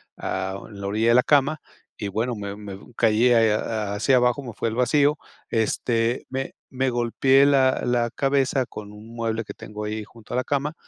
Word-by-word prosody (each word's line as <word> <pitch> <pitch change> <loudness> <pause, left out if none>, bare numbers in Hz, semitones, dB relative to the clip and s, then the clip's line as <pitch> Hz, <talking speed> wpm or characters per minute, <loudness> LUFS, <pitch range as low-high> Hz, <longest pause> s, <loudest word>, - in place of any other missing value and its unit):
ah, 95 +1 -3
en 100 -2 -11
la 100 - -5
orilla 110 +3 0
de 120 - +5
la 125 - +5
cama 145 +1 +3 0.4
y 100 -2 -3
bueno, 115 +4 -1
me 100 -1 -5
me 100 -2 -8 0.2
caí 115 +3 +4
ahí, 115 -1 +5
ha 105 -1 -1
hacia 130 +5 +3
abajo, 125 +3 +2
me 120 -3 -7
fui - - -2
al 110 - -5
vacío, 145 +4 +3 0.3
este, 115 +1 0
me 135 0 -4 0.2
me 130 0 -1
golpeé 130 +3 +3
la 130 -2 +3
la 120 -1 +1
cabeza 135 -2 +1
con 105 -1 -9
un 110 +3 -12
mueble 115 -1 -2
que - - -10
tengo 105 0 -7
ahí 105 0 -3
junto 110 +1 -13
a - - +1
la 130 - +1
cama, 145 +2 -1
115 Hz, 205 wpm, -24 LUFS, 105-130 Hz, 0.4 s, de